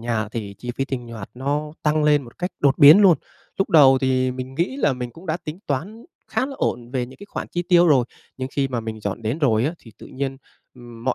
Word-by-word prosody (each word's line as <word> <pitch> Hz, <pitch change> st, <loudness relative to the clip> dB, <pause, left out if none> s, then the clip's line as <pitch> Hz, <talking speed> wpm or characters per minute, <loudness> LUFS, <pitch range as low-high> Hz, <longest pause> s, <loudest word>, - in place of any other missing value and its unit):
nhà 115 Hz, -2 st, -2 dB
thì 105 Hz, -3 st, -6 dB
chi 125 Hz, -, -5 dB
phí 135 Hz, -, 0 dB
tinh 130 Hz, -3 st, -5 dB
hoạt 110 Hz, -4 st, -8 dB
nó 145 Hz, +4 st, -2 dB
tăng 150 Hz, 0 st, +2 dB
lên 150 Hz, -1 st, +4 dB
một 120 Hz, -2 st, -15 dB
cách 180 Hz, +1 st, -2 dB
đột 140 Hz, -2 st, +3 dB
biến 150 Hz, +8 st, +9 dB
luôn. 190 Hz, -5 st, +6 dB, 0.4 s
Lúc 195 Hz, -, 0 dB
đầu 135 Hz, -4 st, +7 dB
thì 130 Hz, -1 st, +1 dB
mình 130 Hz, +1 st, -7 dB
nghĩ 175 Hz, -, -1 dB
là 265 Hz, -, +2 dB
mình 125 Hz, -1 st, -5 dB
cũng 165 Hz, +8 st, -14 dB
đã 160 Hz, -1 st, 0 dB
tính 160 Hz, -1 st, -8 dB
toán 185 Hz, -, -4 dB, 0.2 s
khá 260 Hz, -, 0 dB
là 275 Hz, -, -7 dB
ổn 120 Hz, 0 st, -2 dB
về 125 Hz, -2 st, -2 dB
những 130 Hz, -, -14 dB
cái 205 Hz, -, -11 dB
khoản -, -, -5 dB
chi 175 Hz, -, -2 dB
tiêu 175 Hz, -1 st, +6 dB
rồi, 135 Hz, -5 st, +4 dB, 0.3 s
nhưng 130 Hz, 0 st, -4 dB
khi 140 Hz, -1 st, 0 dB
mà 125 Hz, -3 st, -2 dB
mình 110 Hz, -1 st, -6 dB
dọn 100 Hz, +2 st, -4 dB
đến 115 Hz, +7 st, -2 dB
rồi 120 Hz, -7 st, +2 dB
á, 150 Hz, -, 0 dB
thì 115 Hz, -, -16 dB
tự -, -, -11 dB
nhiên, 135 Hz, 0 st, -4 dB, 0.4 s
ừm, 120 Hz, -2 st, -12 dB
mọi 130 Hz, -, +1 dB
135 Hz, 260 wpm, -22 LUFS, 120-155 Hz, 0.4 s, biến